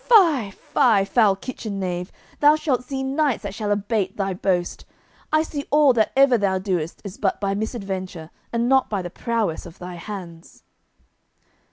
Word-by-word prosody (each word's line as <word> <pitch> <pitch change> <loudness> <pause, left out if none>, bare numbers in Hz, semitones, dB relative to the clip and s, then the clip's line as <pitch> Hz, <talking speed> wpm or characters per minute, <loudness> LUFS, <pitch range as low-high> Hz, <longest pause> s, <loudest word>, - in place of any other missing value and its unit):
"Fie, 330 - +5
fie, 215 0 +2
foul 210 -2 +3
kitchen 210 -1 -6
knave, 180 -1 -3 0.3
thou 295 +1 +6
shalt 295 -6 0
see 265 0 -4
knights 275 -1 0
that 200 -1 -5
shall 210 0 -3
abate 205 -1 -1
thy 195 -1 -1
boast. 180 -1 -1 0.5
I 310 0 +4
see 290 -3 -5
all 295 -2 +5
that 220 -3 +2
ever 270 -3 +5
thou 195 -2 +1
doest 180 -4 -3
is 200 -2 -8
but 195 -2 0
by 195 -1 0
misadventure, 195 -6 -4 0.2
and 235 0 0
not 265 0 +3
by 200 -3 -2
prowess 215 -4 -2
of 170 - -14
thy 180 0 -8
hands." 170 -3 -9
205 Hz, 165 wpm, -23 LUFS, 190-260 Hz, 0.5 s, thou